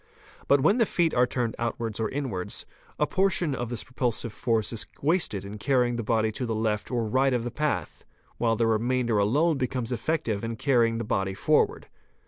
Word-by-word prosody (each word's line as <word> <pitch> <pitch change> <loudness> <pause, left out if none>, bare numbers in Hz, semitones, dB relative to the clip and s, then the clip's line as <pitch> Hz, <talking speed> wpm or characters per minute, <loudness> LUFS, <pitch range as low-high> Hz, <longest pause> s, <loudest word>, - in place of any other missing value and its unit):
But 140 -1 +4
when 200 - +3
the 230 - +4
feet 170 -2 +1
are 125 0 +3
turned 120 -2 -2
outwards 115 -2 -3
or 110 - 0
inwards, 130 -10 -3 0.3
a 150 - +2
portion 185 -4 +1
of 120 -3 -3
this 120 -2 -2
propulsive 120 -3 -2
force 115 -3 0
is 115 - -3
wasted 145 - +1
in 105 +2 -8
carrying 125 0 +2
the 120 - -2
body 110 0 +1
to 125 +3 -4
the 115 - -1
left 110 -1 -1
or 120 -3 -1
right 130 +4 +2
of 120 -2 0
the 120 - -4
path; 150 +4 -2 0.4
while 115 -1 +2
the 115 +1 +1
remainder 115 0 +1
alone 145 +9 +2
becomes 125 -2 -2
effective 115 -4 -1
in 115 0 -3
carrying 115 -2 +2
the 115 - -2
body 95 -2 -1
forward. 150 +9 +2
120 Hz, 195 wpm, -27 LUFS, 110-135 Hz, 0.4 s, But